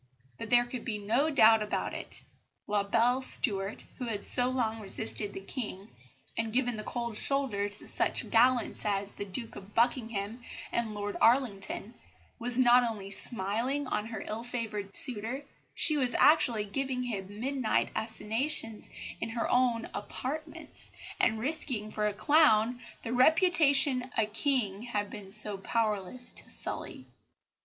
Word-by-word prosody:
But 225 - -6
there 240 0 +5
could 240 -1 -6
be 220 -4 -3
no 230 +9 0
doubt 225 -6 +5
about 210 - -3
it. - - -3 0.4
La 205 0 +1
belle 235 +6 +1
Stuart, 200 -5 +4 0.2
who 250 - -3
had 210 -4 -1
so 250 0 +7
long 230 -4 -2
resisted 210 0 -2
the 195 - -7
King, 205 -2 -6 0.5
and 225 -1 -2
given 245 0 0
the 215 - -6
cold 235 0 -4
shoulder 230 -6 +1
to 205 - -5
such - - -1
gallants 245 +1 +2
as 200 -1 -1
the 205 - -7
Duke 225 +4 -3
of 195 +2 -12
Buckingham 230 -2 -1 0.3
and 225 -3 -2
Lord 205 0 -4
Arlington, 230 -3 +1 0.5
was 245 +1 0
not 250 -1 +6
only 210 -4 -5
smiling 230 +8 +1
on 215 -4 -3
her 225 -1 -6
ill 220 +2 -5
favoured 220 -5 -5
suitor, 250 +3 -1 0.3
she 305 - +2
was 255 -3 0
actually 250 -9 +4
giving 260 +3 -3
him 205 -4 -6
midnight 260 -2 -1
assignations 225 +2 0 0.3
in - - -4
her 230 0 -2
own 245 -2 +1
apartments, 305 +8 -5 0.3
and 225 - +2
risking 240 -4 +1
for 210 0 -1
a 210 - -2
clown 245 -5 +3 0.2
the 230 - -4
reputation 285 -3 +3
a 220 - +3
King 215 -2 0
had 210 -4 -4
been 205 -3 -9 0.3
powerless 220 +2 0
to - - -6
sully. - - -3
230 Hz, 150 wpm, -29 LUFS, 210-255 Hz, 0.5 s, so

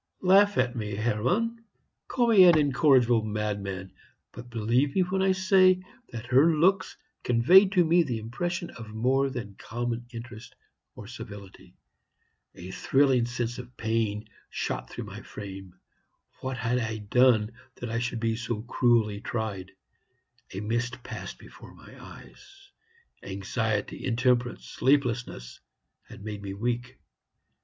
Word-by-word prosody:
"Laugh 200 +2 +5
at 125 -1 +1
me, 105 -3 -4
Hermann 150 - -1 0.4
call 240 -2 +1
me 200 -5 +8
an 170 -3 +7
incorrigible 130 -5 +4
madman; 100 -3 -4 0.4
but 120 +1 -11
believe 120 +5 0
me 190 - +4
when 185 +1 0
I 190 0 +3
say 185 -1 +4 0.3
that 115 0 -7
her 140 +7 +4
looks 190 +5 +2 0.2
conveyed 180 - +5
to 180 -4 +4
me 170 +2 +4
the 130 -8 -2
impression 170 +11 -4
of 115 -2 -10
more 130 +5 +1
than 115 -6 -6
common 120 +1 -4
interest 120 -1 -10 0.4
or 105 - -10
civility. 100 -5 -11 0.8
A 90 +1 -9
thrilling 135 +1 +2
sense 120 0 -3
of 125 0 -11
pain 110 -1 -1 0.2
shot - - -4
through - - -6
my - - -9
frame. 95 -3 -9 0.6
What 130 0 -4
had 125 +1 0
I 110 -2 -3
done 110 +1 +3 0.2
that 120 -2 -6
I 115 - -1
should 120 -1 -3
be 115 0 0
so 115 -2 -4
cruelly 115 -4 +1
tried? 105 -5 -4 0.8
A 95 - -5
mist 120 +3 -2
passed - - -7
before - - -14
my - - -15
eyes; 395 -1 -15 0.5
anxiety, 105 +2 -3
intemperance, 120 0 0
sleeplessness, 125 - -1 0.5
had - - -11
made 105 -1 -6
me 100 -1 -6
weak. 120 +4 -3
120 Hz, 135 wpm, -27 LUFS, 110-140 Hz, 0.8 s, me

